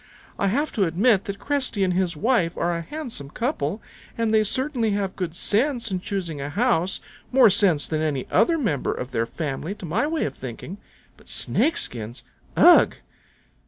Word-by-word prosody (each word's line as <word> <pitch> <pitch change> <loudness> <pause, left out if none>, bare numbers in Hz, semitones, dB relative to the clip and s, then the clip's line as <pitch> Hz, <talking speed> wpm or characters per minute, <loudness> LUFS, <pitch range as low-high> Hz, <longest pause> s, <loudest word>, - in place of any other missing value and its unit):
I 200 - +2
have 285 +10 0
to 200 - +1
admit 195 +5 +2
that 200 0 -5
Cresty 265 -8 -1
and 185 -1 +1
his 180 -3 0
wife 190 -4 +1
are 175 0 0
a 170 - -3
handsome 235 - -6
couple, 215 - -3 0.3
and 225 -1 0
they 215 0 +4
certainly 255 +1 -1
have 200 -2 -2
good 175 -3 -4
sense 235 +3 +1
in 185 - -1
choosing 180 -6 -3
a 140 - -4
house, 190 -1 +1 0.3
more 250 -5 +6
sense 185 -7 +4
than 155 -1 -1
any 145 -5 -1
other 230 - +3
member 165 - -1
of 125 +1 -6
their 115 -1 -1
family 155 - -4
to 190 - -9
my 205 - 0
way 320 0 -1
of 140 - -3
thinking. 135 - -8 0.4
But - - -15
Snake 320 - +2
skins! 120 +1 -3 0.3
Ugh!" - - +7
195 Hz, 180 wpm, -24 LUFS, 160-235 Hz, 0.4 s, Ugh